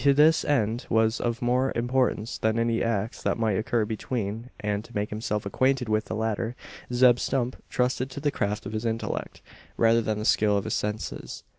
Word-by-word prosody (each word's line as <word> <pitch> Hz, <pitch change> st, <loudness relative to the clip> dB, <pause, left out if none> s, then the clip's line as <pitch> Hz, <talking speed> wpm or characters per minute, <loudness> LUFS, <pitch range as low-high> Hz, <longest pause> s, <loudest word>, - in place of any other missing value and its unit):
This 150 Hz, +3 st, +5 dB
end 120 Hz, -4 st, 0 dB
was 110 Hz, +1 st, +2 dB
of 120 Hz, 0 st, -1 dB
more 125 Hz, +2 st, +2 dB
importance 120 Hz, -2 st, 0 dB
than 110 Hz, +1 st, +1 dB
any 115 Hz, 0 st, +1 dB
acts 115 Hz, -1 st, -1 dB
that -, -, 0 dB
might 110 Hz, -3 st, +1 dB
occur 115 Hz, 0 st, +1 dB
between; 110 Hz, +1 st, -3 dB
and, 105 Hz, 0 st, -1 dB
to 120 Hz, -, -15 dB
make 105 Hz, 0 st, -1 dB
himself 105 Hz, -1 st, -2 dB
acquainted 130 Hz, +5 st, +1 dB
with 110 Hz, 0 st, +1 dB
the -, -, -4 dB
latter, 110 Hz, +2 st, -1 dB, 0.4 s
Zeb 125 Hz, 0 st, +5 dB
Stump 125 Hz, -1 st, -1 dB
trusted 125 Hz, +1 st, 0 dB
to 135 Hz, -, -7 dB
the 145 Hz, 0 st, 0 dB
craft 105 Hz, -3 st, -2 dB
of 105 Hz, -, -5 dB
his 110 Hz, +1 st, -2 dB
intellect, 115 Hz, -1 st, -3 dB, 0.3 s
rather 115 Hz, 0 st, +4 dB
than 110 Hz, -1 st, -1 dB
the 105 Hz, -, -3 dB
skill 105 Hz, -2 st, +3 dB
of 100 Hz, -, -1 dB
his -, -, -3 dB
senses. 105 Hz, +1 st, -4 dB
115 Hz, 190 wpm, -26 LUFS, 110-125 Hz, 0.4 s, This